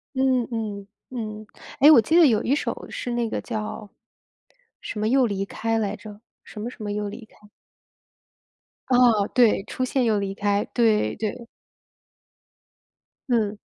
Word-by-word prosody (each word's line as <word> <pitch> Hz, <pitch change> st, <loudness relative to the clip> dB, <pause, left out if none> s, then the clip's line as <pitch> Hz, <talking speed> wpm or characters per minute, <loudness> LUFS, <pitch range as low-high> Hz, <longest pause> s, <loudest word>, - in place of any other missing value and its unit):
嗯 260 Hz, -2 st, +2 dB
嗯， 210 Hz, -4 st, -4 dB, 0.2 s
嗯。 215 Hz, -3 st, -6 dB, 0.3 s
诶， 290 Hz, -, +9 dB
我 300 Hz, -, +8 dB
记 315 Hz, +10 st, +1 dB
得 340 Hz, -3 st, +8 dB
有 220 Hz, -5 st, +2 dB
一 265 Hz, -, +1 dB
首 295 Hz, -, -3 dB
是 245 Hz, -, -4 dB
那 240 Hz, -1 st, -1 dB
个 -, -, -3 dB
叫， 215 Hz, -2 st, -6 dB, 0.9 s
什 215 Hz, -, -6 dB
么 215 Hz, +1 st, 0 dB
又 260 Hz, +1 st, +4 dB
离 195 Hz, -2 st, -2 dB
开 225 Hz, +2 st, -2 dB
来 210 Hz, -3 st, -2 dB
着， 210 Hz, -1 st, -12 dB, 0.2 s
什 210 Hz, -, -10 dB
么 230 Hz, +3 st, -4 dB
什 245 Hz, -, -12 dB
么 205 Hz, -1 st, -3 dB
又 210 Hz, 0 st, -3 dB
离 220 Hz, +3 st, -9 dB
开？ 210 Hz, -1 st, -22 dB, 1.4 s
哦， 240 Hz, -5 st, +4 dB
对， 235 Hz, -5 st, +4 dB
《出 255 Hz, -, -3 dB
现 255 Hz, 0 st, 0 dB
又 220 Hz, -3 st, +2 dB
离 195 Hz, -1 st, -3 dB
开》， 205 Hz, 0 st, 0 dB
对 215 Hz, -, +2 dB
对。 220 Hz, +2 st, -4 dB, 1.8 s
嗯。 215 Hz, -4 st, +1 dB
220 Hz, 165 characters per minute, -24 LUFS, 210-245 Hz, 1.8 s, 诶